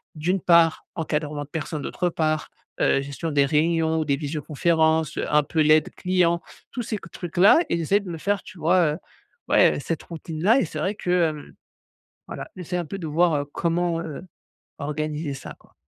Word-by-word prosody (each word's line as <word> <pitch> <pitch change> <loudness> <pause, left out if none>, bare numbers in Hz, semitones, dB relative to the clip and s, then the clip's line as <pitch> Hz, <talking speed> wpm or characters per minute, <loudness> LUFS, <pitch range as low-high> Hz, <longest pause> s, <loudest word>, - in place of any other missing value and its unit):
d'une 180 +5 0
part, 170 -2 +4
encadrement 150 -2 -2
de 145 - -14
personnes, 155 -1 -4
d'autre 175 +5 -1
part, 155 -2 -1 0.3
heu, 135 - +3
gestion 140 +4 -5
des 140 -1 +3
réunions 160 +2 +1
ou 155 - -1
des 140 -1 +1
visioconférences, 160 +1 0
heu, - - -1
un 150 -1 +5
peu 160 +2 -3
l'aide 155 0 +4
client, 180 -2 +1 0.3
tous 245 - -4
ces 215 - -3
que 170 - -12
trucs-là 180 - +4
et 170 - +1
j'essaie 180 +5 +2
de 195 -3 -9
me 165 - -5
faire 200 +3 0
tu 190 - -13
vois, 165 -2 +3
heu, - - -5 0.5
ouais, - - +5
heu, - - -4
cette 165 - -3
routine-là 170 - 0
et - - 0
c'est 155 - -8
vrai 190 +7 -1
que, 180 - -6 0.2
hem, 150 -2 -9 0.8
voilà, - - -7
j'essaye 180 0 -4
un - - -4
peu 195 +6 -6
de 165 - -5
voir 155 -2 +2
comment, 170 0 0
heu, 165 -1 -6 0.6
organiser 150 0 -3
ça, 135 - -9
quoi. - - -25
160 Hz, 195 wpm, -24 LUFS, 150-175 Hz, 0.8 s, un